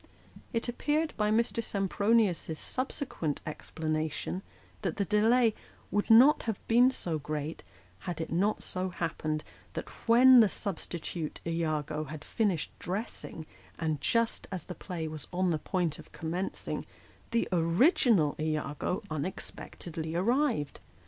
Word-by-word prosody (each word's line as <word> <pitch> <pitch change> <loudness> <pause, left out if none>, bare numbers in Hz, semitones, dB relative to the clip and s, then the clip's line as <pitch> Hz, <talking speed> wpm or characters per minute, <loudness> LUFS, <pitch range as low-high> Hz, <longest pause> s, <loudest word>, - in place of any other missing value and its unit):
It 230 0 -1
appeared 300 +6 0
by 210 -1 +1
Mr. 230 +1 +1
Sempronius's 200 -4 +1
subsequent 255 - -2
explanation, 155 +3 -3 0.4
that - - -1
the 200 - +1
delay 225 +3 +4 0.4
would 205 - 0
not 255 +7 +8
have 220 -4 -1
been 245 +3 +6
so 170 -11 -2
great, 150 +2 -4 0.4
had 175 -3 -5
it 160 - -4
not 195 +6 +1
so 185 0 -2
happened 155 -3 -2 0.3
that - - -4 0.2
when 250 +2 +8
the 220 -3 +6
substitute 170 -4 -4
lago 155 -2 -1
had 150 +1 -8
finished 200 -8 0
dressing, 185 -4 -4 0.3
and 155 -3 -1
just 230 -1 +1
as 185 -4 -3
the 180 - -6
play 175 -3 -5
was 155 -2 -6
on 180 0 +1
the 155 - 0
point 170 -2 -1
of - - -13
commencing, 175 +4 -3 0.4
the 230 - +1
original 175 - +4
lago 155 +2 -1
unexpectedly 160 +1 -5
arrived. 235 - +1
180 Hz, 130 wpm, -30 LUFS, 155-225 Hz, 0.4 s, not